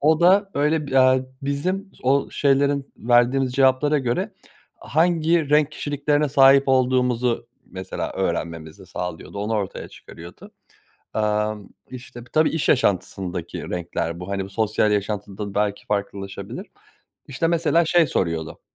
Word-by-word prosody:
o 155 Hz, +3 st, +3 dB
da 195 Hz, +3 st, +4 dB
öyle 150 Hz, +1 st, +1 dB
bi 135 Hz, -1 st, +2 dB
aaa, 130 Hz, 0 st, +5 dB, 0.2 s
bizim 185 Hz, +8 st, -2 dB
o 135 Hz, +2 st, +2 dB
şeylerin 140 Hz, 0 st, +1 dB
verdiğimiz 125 Hz, +2 st, +2 dB
cevaplara 135 Hz, +3 st, +3 dB
göre 180 Hz, -, -2 dB, 0.4 s
hangi 165 Hz, -1 st, +1 dB
renk 150 Hz, 0 st, +3 dB
kişiliklerine 145 Hz, 0 st, 0 dB
sahip 135 Hz, 0 st, +6 dB
olduğumuzu, 125 Hz, -2 st, +1 dB, 0.2 s
mesela, 95 Hz, 0 st, -5 dB
öğrenmemizi 85 Hz, -1 st, -4 dB
sağlıyordu, 90 Hz, +2 st, -6 dB
onu 105 Hz, +2 st, -2 dB
ortaya 100 Hz, -3 st, -4 dB
çıkarıyordu. 85 Hz, +1 st, -13 dB, 0.6 s
Aaa, 105 Hz, 0 st, 0 dB, 0.4 s
işte, 120 Hz, -1 st, -10 dB
tabii 155 Hz, 0 st, +3 dB
iş 160 Hz, -2 st, -2 dB
yaşantısındaki 95 Hz, -, -1 dB
renkler 85 Hz, -1 st, -3 dB
bu, 90 Hz, -, -7 dB
hani, 100 Hz, 0 st, -3 dB
sosyal 105 Hz, 0 st, +1 dB
yaşantıda 100 Hz, 0 st, -3 dB
belki 105 Hz, -1 st, -1 dB
farklılaşabilir. 100 Hz, -1 st, -4 dB, 0.6 s
İşte, 140 Hz, +5 st, -1 dB
mesela, 170 Hz, 0 st, +2 dB
şey 165 Hz, -1 st, +3 dB
soruyordu, 80 Hz, -3 st, -2 dB
130 Hz, 120 wpm, -22 LUFS, 100-145 Hz, 0.6 s, sahip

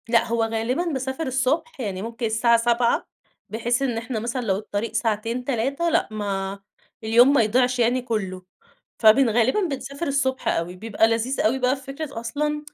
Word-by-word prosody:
لأ، 230 Hz, -1 st, +4 dB
هو 230 Hz, 0 st, 0 dB
غالبًا 225 Hz, +7 st, -1 dB
باسافر 270 Hz, -2 st, -3 dB
الصبح 270 Hz, +5 st, -1 dB
يعني 195 Hz, -6 st, -3 dB
ممكن 230 Hz, +2 st, -4 dB
الساعة 230 Hz, +1 st, +3 dB
07:00 235 Hz, 0 st, +1 dB, 0.4 s
بحيث 235 Hz, +3 st, -1 dB
إن 250 Hz, -4 st, 0 dB
إحنا 225 Hz, 0 st, -3 dB
مثلًا 240 Hz, +3 st, -3 dB
لو 200 Hz, -5 st, 0 dB
الطريق 210 Hz, +1 st, -4 dB
ساعتين 230 Hz, +2 st, -1 dB
3 275 Hz, +7 st, 0 dB
لأ، -, -, +2 dB
ما 200 Hz, -2 st, -3 dB, 0.4 s
اليوم 240 Hz, +5 st, +5 dB
ما 280 Hz, -, +5 dB
يضيعش 250 Hz, +3 st, +1 dB
يعني 245 Hz, +2 st, +2 dB
كلّه. 195 Hz, -6 st, -4 dB, 0.6 s
فبن 230 Hz, +3 st, +6 dB
غالبا 240 Hz, -, +2 dB
بنسافر 280 Hz, +2 st, -5 dB
الصبح 275 Hz, -2 st, -1 dB
أوي، 170 Hz, +2 st, -1 dB
بيبقى 220 Hz, +3 st, +1 dB
لذيذ 230 Hz, +4 st, 0 dB
أوي 245 Hz, +5 st, +1 dB
بقى 255 Hz, +1 st, +2 dB
في 270 Hz, -, -12 dB
فكرة 275 Hz, -1 st, -6 dB
أصلًا 295 Hz, +5 st, -2 dB
235 Hz, 170 wpm, -23 LUFS, 225-265 Hz, 0.6 s, فبن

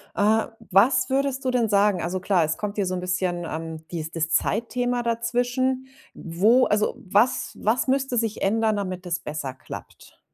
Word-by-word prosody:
Äh, 215 Hz, +2 st, +3 dB, 0.2 s
was 210 Hz, +9 st, +4 dB
würdest 270 Hz, 0 st, 0 dB
du 255 Hz, -, +2 dB
denn 235 Hz, -3 st, +1 dB
sagen 200 Hz, -3 st, +3 dB
also 180 Hz, +2 st, -2 dB
klar, 185 Hz, -2 st, +2 dB
es 155 Hz, 0 st, -1 dB
kommt 205 Hz, -1 st, -4 dB
hier 205 Hz, -, 0 dB
so 185 Hz, -, -2 dB
'n -, -, -3 dB
bisschen, 180 Hz, -1 st, -1 dB
ähm, 160 Hz, 0 st, -6 dB
dies 160 Hz, -2 st, -4 dB
das 165 Hz, -1 st, -1 dB
Zeitthema 240 Hz, +6 st, 0 dB
dazwischen. 245 Hz, +3 st, 0 dB, 0.3 s
Wo 210 Hz, +10 st, +3 dB
also 210 Hz, 0 st, +1 dB
was 245 Hz, +6 st, +2 dB
was 230 Hz, +5 st, +1 dB
müsste 265 Hz, -2 st, +1 dB
sich 225 Hz, -2 st, -1 dB
ändern, 220 Hz, +2 st, +2 dB
damit 185 Hz, -2 st, -4 dB
es 175 Hz, -1 st, -2 dB
besser 150 Hz, -4 st, -5 dB
klappt? 130 Hz, -, -11 dB
210 Hz, 175 wpm, -24 LUFS, 180-245 Hz, 0.3 s, was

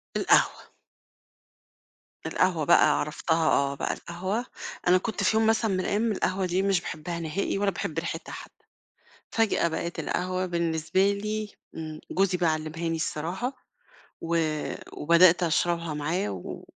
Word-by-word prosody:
القهوة. -, -, +3 dB, 1.6 s
القهوة 175 Hz, -5 st, +1 dB
بقى -, -, +5 dB
عرفتها 160 Hz, +2 st, 0 dB
آه 140 Hz, 0 st, +2 dB
بقى -, -, -2 dB
القهوة، 190 Hz, +7 st, -3 dB, 0.4 s
أنا 180 Hz, +1 st, +6 dB
كنت 200 Hz, 0 st, -3 dB
في 220 Hz, +3 st, +3 dB
يوم 220 Hz, 0 st, +3 dB
مثلًا 225 Hz, -1 st, +2 dB
من 185 Hz, -, 0 dB
الأيام 215 Hz, +4 st, 0 dB
القهوة 190 Hz, -1 st, 0 dB
دي 180 Hz, +1 st, +1 dB
مش 195 Hz, -2 st, +2 dB
باحبها 170 Hz, +2 st, -5 dB
نهائي 170 Hz, +5 st, -2 dB
ولا 200 Hz, 0 st, +2 dB
باحب 165 Hz, -3 st, -3 dB
ريحتها 165 Hz, -1 st, -5 dB
حتّي، -, -, -11 dB, 0.7 s
فجأة 220 Hz, -6 st, +2 dB
بقِت 170 Hz, +1 st, -4 dB
القهوة 185 Hz, +1 st, -1 dB
بالنسبة 170 Hz, +3 st, +1 dB
لي 210 Hz, +1 st, -4 dB, 0.2 s
امم، 155 Hz, -1 st, -6 dB
جوزي 185 Hz, -1 st, +1 dB
بقي 170 Hz, -2 st, +3 dB
علّمها 155 Hz, +2 st, -3 dB
لي 165 Hz, -, -1 dB
الصراحة، 170 Hz, -, -2 dB, 0.7 s
و 170 Hz, 0 st, 0 dB, 0.6 s
وبدأت 170 Hz, +2 st, +5 dB
أشربها 170 Hz, -1 st, 0 dB
معاه 150 Hz, -, -1 dB
و 90 Hz, -2 st, -7 dB
175 Hz, 140 wpm, -27 LUFS, 160-195 Hz, 1.6 s, أنا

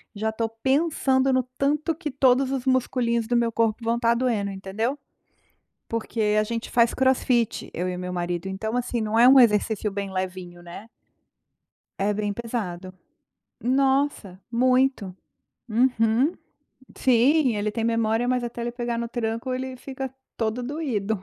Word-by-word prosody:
já 220 Hz, +2 st, -1 dB
estou 225 Hz, +1 st, -2 dB
pensando 265 Hz, +2 st, +1 dB
no 260 Hz, 0 st, +2 dB
tanto 300 Hz, +4 st, +1 dB
que 310 Hz, -1 st, -5 dB
todos 260 Hz, 0 st, +3 dB
os 270 Hz, -2 st, -2 dB
musculinhos 245 Hz, -3 st, +1 dB
do 240 Hz, +1 st, +2 dB
meu 235 Hz, -1 st, +1 dB
corpo 225 Hz, -1 st, +1 dB
vão 230 Hz, +1 st, +1 dB
estar 235 Hz, -1 st, +2 dB
doendo 230 Hz, -5 st, 0 dB
entendeu. 195 Hz, +7 st, -3 dB, 0.9 s
Porque 220 Hz, -2 st, -1 dB
a 215 Hz, -, +3 dB
gente 230 Hz, +1 st, -4 dB
faz 235 Hz, -1 st, +3 dB
Crossfit 255 Hz, -3 st, +1 dB
eu 180 Hz, +2 st, -2 dB
e 180 Hz, -, -3 dB
o -, -, -7 dB
meu 180 Hz, 0 st, -5 dB
marido 175 Hz, 0 st, -3 dB
então 220 Hz, +5 st, -3 dB
assim 245 Hz, -1 st, -1 dB
não 220 Hz, +1 st, 0 dB
é 240 Hz, -, +7 dB
um 265 Hz, 0 st, +8 dB
exercício 215 Hz, -2 st, +2 dB
bem 200 Hz, -1 st, -4 dB
levinho, 185 Hz, -2 st, -5 dB
né. 175 Hz, +5 st, -10 dB, 1.1 s
É 200 Hz, +2 st, +1 dB
bem 205 Hz, 0 st, -2 dB
pesado. 200 Hz, -5 st, -5 dB, 0.7 s
Nossa 265 Hz, -6 st, +1 dB
muito. 255 Hz, -4 st, +2 dB, 0.5 s
Uhum. 235 Hz, +4 st, +2 dB, 0.6 s
Sim 260 Hz, +2 st, +3 dB
ele 205 Hz, +1 st, -1 dB
tem 225 Hz, +1 st, -3 dB
memória 230 Hz, 0 st, +1 dB
mas 250 Hz, -1 st, +1 dB
até 240 Hz, 0 st, -5 dB
ele 240 Hz, 0 st, -3 dB
pegar 240 Hz, -1 st, -3 dB
no 235 Hz, 0 st, -3 dB
tranco 230 Hz, +1 st, -3 dB
ele 260 Hz, 0 st, -4 dB
fica 265 Hz, 0 st, -6 dB, 0.2 s
todo 225 Hz, +2 st, -1 dB
doído. 235 Hz, -, -2 dB
235 Hz, 155 wpm, -24 LUFS, 210-255 Hz, 1.1 s, um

